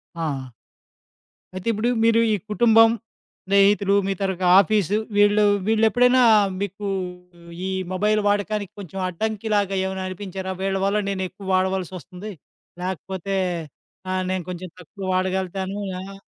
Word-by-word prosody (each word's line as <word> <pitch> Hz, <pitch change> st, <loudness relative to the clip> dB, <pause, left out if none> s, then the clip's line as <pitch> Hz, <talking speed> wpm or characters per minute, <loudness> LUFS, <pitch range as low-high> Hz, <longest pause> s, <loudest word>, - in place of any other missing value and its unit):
ఆ! 140 Hz, -6 st, -4 dB, 1.0 s
ఆ! -, -, -13 dB
అయితే 185 Hz, +4 st, -6 dB
ఇప్పుడు 225 Hz, +2 st, 0 dB
మీరు 230 Hz, 0 st, +4 dB
ఈ -, -, +3 dB, 0.2 s
కుటుంబం, 225 Hz, 0 st, +6 dB, 0.6 s
స్నేహితులు 200 Hz, +1 st, +4 dB
మీ 195 Hz, -, +1 dB
తరుక 190 Hz, -2 st, -2 dB, 0.2 s
ఆఫీసు 205 Hz, -1 st, +3 dB, 0.2 s
వీళ్ళు 205 Hz, +1 st, +5 dB, 0.2 s
వీళ్ళెప్పుడైనా 245 Hz, +3 st, +4 dB, 0.4 s
మీకు 200 Hz, +1 st, -4 dB, 0.8 s
ఈ -, -, -2 dB, 0.2 s
మొబైల్ 210 Hz, +3 st, +2 dB
వాడకానికి 205 Hz, -1 st, -1 dB
కొంచెం 195 Hz, 0 st, -7 dB
అడ్డంకి 215 Hz, +4 st, -3 dB
లాగా 195 Hz, -1 st, +1 dB
ఏమైనా 190 Hz, 0 st, -3 dB
అనిపించారా? 190 Hz, 0 st, -5 dB
వీళ్ళ 195 Hz, 0 st, 0 dB
వల్ల 205 Hz, +1 st, +1 dB
నేను 190 Hz, -1 st, -2 dB
ఎక్కువ 195 Hz, 0 st, -12 dB
వాడవలసి 185 Hz, -1 st, 0 dB
వస్తుంది. 185 Hz, +5 st, -9 dB, 0.5 s
లేకపోతే 190 Hz, +1 st, -4 dB, 0.8 s
ఆహ్, 185 Hz, 0 st, 0 dB
నేను 185 Hz, -2 st, -2 dB
కొంచెం 180 Hz, 0 st, -6 dB
తక్కువ 190 Hz, +4 st, -11 dB
వాడగలుగుతాను. 190 Hz, +1 st, -1 dB, 0.2 s
ఆహ్, 195 Hz, +1 st, -9 dB
195 Hz, 130 wpm, -23 LUFS, 185-210 Hz, 1.0 s, కుటుంబం